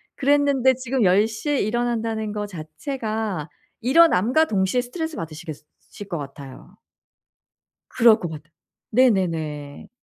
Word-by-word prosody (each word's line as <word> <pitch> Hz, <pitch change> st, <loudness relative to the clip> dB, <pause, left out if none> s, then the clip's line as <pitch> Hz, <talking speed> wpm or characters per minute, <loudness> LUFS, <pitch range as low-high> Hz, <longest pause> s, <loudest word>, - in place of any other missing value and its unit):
그랬는데 280 Hz, -2 st, +3 dB
지금 255 Hz, 0 st, -1 dB
10 195 Hz, +3 st, +4 dB
시에 230 Hz, +6 st, -2 dB
일어난다는 225 Hz, -1 st, -1 dB
거 210 Hz, 0 st, -3 dB
자체가 205 Hz, -, -4 dB, 0.3 s
일어남과 265 Hz, -, +4 dB
동시에 200 Hz, -1 st, 0 dB
스트레스 320 Hz, +6 st, -5 dB
받으시겠 155 Hz, -1 st, -7 dB, 0.4 s
으실 205 Hz, -, -9 dB
것 175 Hz, -4 st, -4 dB
같아요. 140 Hz, -2 st, -10 dB, 1.1 s
그럴 230 Hz, -2 st, +5 dB
것 175 Hz, -, -4 dB
같아. 155 Hz, -1 st, -10 dB, 0.4 s
네네네. 165 Hz, -, 0 dB
220 Hz, 275 characters per minute, -23 LUFS, 170-255 Hz, 1.1 s, 그럴